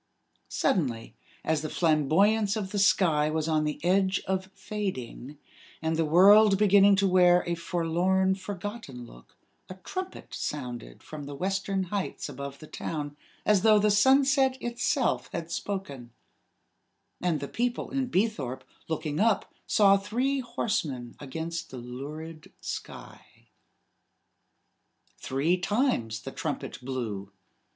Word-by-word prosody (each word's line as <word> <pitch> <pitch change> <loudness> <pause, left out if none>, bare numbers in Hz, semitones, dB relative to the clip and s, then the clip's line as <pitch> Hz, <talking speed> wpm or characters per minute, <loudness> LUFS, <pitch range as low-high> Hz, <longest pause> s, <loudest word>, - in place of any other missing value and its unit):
Suddenly, 115 - 0 0.3
as 160 -1 0
the 155 - -4
flamboyance 190 +8 +2
of 200 -3 -4
the 205 - -1
sky 160 -6 +3
was 155 0 -1
on 155 -1 +1
the 150 -1 -3
edge 190 +1 +3
of 190 0 -2
fading, 150 - -5 0.4
and 160 0 -1
the 165 - +1
world 195 +5 +7
beginning 200 0 +6
to 195 0 +2
wear 180 -1 +5
a 175 - -1
forlorn, 175 +3 +1
forgotten 190 - -7
look, - - -17 0.3
a 185 - -7
trumpet 370 - -7
sounded 125 - -5
from 150 -2 -8
the 145 0 -7
western 195 +3 -1
heights 200 -2 -3
above 140 0 -7
the 155 - -11
town, 150 -2 -5 0.3
as 210 -3 +4
though 215 0 +6
the 210 0 +3
sunset 265 +4 +4
itself 240 +3 0
had 170 -1 -5
spoken; 145 -12 -5 1.1
and 175 -4 +1
the 140 - -5
people 240 - -2
in 270 -1 -1
Beethorpe, 185 - -1 0.2
looking 155 -1 -3
up, 220 -1 +1
saw 200 -2 +5
three 250 +8 -1
horsemen 210 - -3
against 165 +4 -5
the 130 - -8
lurid 150 +6 -8
sky. - - -7 2.0
Three 145 +7 0
times 180 - 0
the - - -6
trumpet - - -5
blew. 110 -7 -4
180 Hz, 130 wpm, -28 LUFS, 145-205 Hz, 2.0 s, world